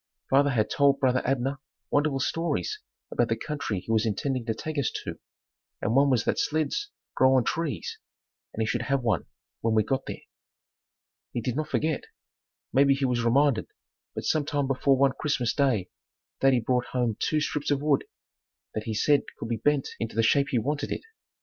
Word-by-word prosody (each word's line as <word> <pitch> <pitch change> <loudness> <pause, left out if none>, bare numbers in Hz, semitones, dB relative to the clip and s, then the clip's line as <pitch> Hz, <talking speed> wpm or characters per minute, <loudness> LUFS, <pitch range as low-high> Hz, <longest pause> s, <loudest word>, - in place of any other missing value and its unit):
Father 140 +2 +5
had 115 -6 +1
told 140 -1 +4
brother 130 -2 +2
Abner 135 +1 0 0.3
wonderful 145 -1 +2
stories 150 - -1 0.3
about 120 - +1
the 115 - +2
country 140 -7 -3
he 115 - -5
was 110 -1 +3
intending 125 +4 -1
to 110 - 0
take 155 +5 -3
us 140 - +1
to - - -6 0.6
and 110 - -1
one 140 +1 +5
was 125 -4 +3
that - - +1
"sleds 155 - 0 0.2
grow 130 0 +4
on 130 - +4
trees" 160 +3 -3 0.5
and 110 - -2
he - - 0
should 115 +1 -1
have 135 +2 0
one 115 -2 0 0.3
when 115 -1 +1
we 110 - +4
got 135 +5 -2
there. - - -6 1.1
He - - -1
did 120 +1 -2
not 155 +1 -2
forget. 155 -1 0 0.7
Maybe 140 0 +5
he 135 0 0
was 125 -2 0
reminded, 130 0 +3 0.5
but - - -4
some 155 -2 +2
time 145 -1 -1
before 135 0 +2
one 135 0 +4
Christmas 125 -6 0
day 125 -11 +1 0.5
daddy 135 -3 +4
brought 125 +1 +1
home 120 -4 +1
two 155 - +1
strips 150 -1 -2
of 145 0 +1
wood 150 -3 +2 0.7
that 110 - -4
he 110 - -2
said 145 +6 +4 0.2
could 115 - -6
be 115 - 0
bent 145 0 +1
into 115 -2 -4
the 115 - +3
shape 140 +5 +4
he 125 - +1
wanted 145 +5 -1
it. - - -2
135 Hz, 190 wpm, -27 LUFS, 115-145 Hz, 1.1 s, Father